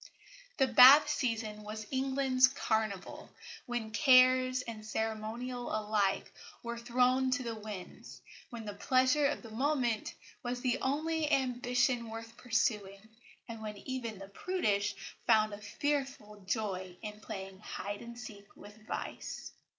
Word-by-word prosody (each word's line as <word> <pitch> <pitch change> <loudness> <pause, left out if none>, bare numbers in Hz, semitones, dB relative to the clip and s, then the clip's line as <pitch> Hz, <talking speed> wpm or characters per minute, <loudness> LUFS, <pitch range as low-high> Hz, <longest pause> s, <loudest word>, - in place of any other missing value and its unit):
The 270 - +4
Bath 260 +4 +9
season 225 -7 -2
was 215 +1 -6
England's 265 -1 +3
carnival, 220 -7 -2 0.4
when 240 -3 -3
cares 255 +1 +5
and 225 -3 -7
ceremonial 225 +3 -3
alike 210 -2 0 0.3
were 235 0 -4
thrown 250 +2 +2
to 255 0 0
the 230 -1 -3
winds, 210 -4 -9 0.3
when 230 -2 -7
the 205 - -5
pleasure 260 +6 +3
of 290 - -3
the 225 - -10
moment 245 -2 0 0.3
was 245 -1 -3
the 255 0 0
only 310 +3 0
ambition 245 -2 +1
worth 225 +1 -8
pursuing, 215 -4 -1 0.4
and 230 -2 -7
when 210 -1 -6
even 235 -2 -5
the 195 +1 -10
prudish 205 - 0 0.3
found 215 -2 +4
a 205 - -7
fearful 265 -2 -3
joy 190 -4 -2
in 210 -1 -6
playing 195 -3 -7
hide 205 0 -6
and 235 0 -9
seek 210 -4 -10
with 205 0 -13
vice. - - -5
235 Hz, 135 wpm, -32 LUFS, 215-255 Hz, 0.4 s, Bath